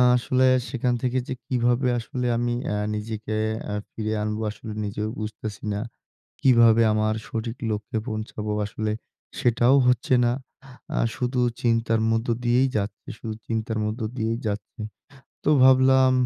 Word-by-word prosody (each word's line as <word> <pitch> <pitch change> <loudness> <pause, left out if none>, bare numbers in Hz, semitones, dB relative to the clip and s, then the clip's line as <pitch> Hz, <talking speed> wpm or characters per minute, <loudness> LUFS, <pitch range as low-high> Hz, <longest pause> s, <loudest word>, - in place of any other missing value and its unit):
আসলে 130 +1 +2 0.2
সেখান 125 -2 0
থেকে 130 0 0
যে - - -2
কীভাবে 125 +1 +1
আসলে 125 +2 -4
আমি 120 0 0
অ্যা 105 - -1 0.2
নিজেকে 110 0 -4 0.3
অ্যা 105 - -3
ফিরে 110 -1 -3
আনবো 105 +1 -2
আসলে 110 +1 -9
নিজেও 105 +1 -3
বুঝতেছি 110 -1 -6
না। 100 - -2 0.6
কীভাবে 115 -3 +6
আমার 110 0 +1
সঠিক 115 +1 -4
লক্ষ্যে 110 +2 -2
পৌঁছাবো? 110 -1 -4
আসলে 105 +1 -3 0.5
সেটাও 120 +2 +4
হচ্ছে 125 +1 +2
না। 120 - +3 0.7
আ - - +2 0.2
শুধু 125 0 -1 0.2
চিন্তার 115 -1 +2
মধ্য 115 +2 0 0.2
দিয়েই 125 +3 +3
যাচ্ছে, 100 +5 -4
শুধু 110 - -5
চিন্তার 110 -1 -2
মধ্য 110 +3 -3 0.2
দিয়েই 115 0 0
যাচ্ছে। 105 +3 -5 0.6
তো 150 - +3
ভাবলাম 130 0 +6
115 Hz, 140 wpm, -25 LUFS, 110-125 Hz, 0.7 s, কীভাবে